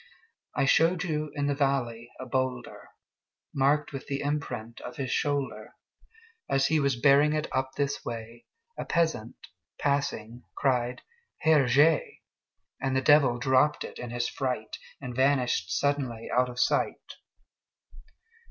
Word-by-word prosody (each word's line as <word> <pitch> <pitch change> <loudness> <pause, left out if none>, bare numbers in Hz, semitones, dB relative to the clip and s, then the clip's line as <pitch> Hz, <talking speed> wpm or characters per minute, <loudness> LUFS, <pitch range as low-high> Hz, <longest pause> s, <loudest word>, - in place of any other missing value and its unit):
I 140 - +2
showed 165 +5 +3
you 155 -3 -2
in 145 -1 -1
the 145 - +1
valley 130 -5 -1
a 130 - -6
boulderMarked 130 +2 -3
with 135 - -7
the 140 -1 -2
imprint 125 -6 -4
of 125 - -8
his 130 -2 -3
shoulder; 145 -2 -2 0.7
As 135 0 +2
he 160 +2 +2
was 140 -2 +1
bearing 145 +3 +5
it 155 0 -1
up 130 0 -1
this 140 0 -1
way,A 120 - -9
peasant, 160 -9 0 0.4
passing, 125 -5 -1 0.2
cried, 125 -3 0 0.4
"Herr 155 -3 +4
Jé!"And 140 -1 0
the 130 - +2
Devil 130 -2 +5
dropped 130 +4 +2
it - - -9
in 125 - -6
his 120 0 -1
fright, 125 -5 -3 0.2
And 125 -3 -7
vanished 130 -7 +2
suddenly 130 -2 -1
out 125 0 +3
of 125 0 -7
sight! - - 0
135 Hz, 130 wpm, -28 LUFS, 125-145 Hz, 0.7 s, bearing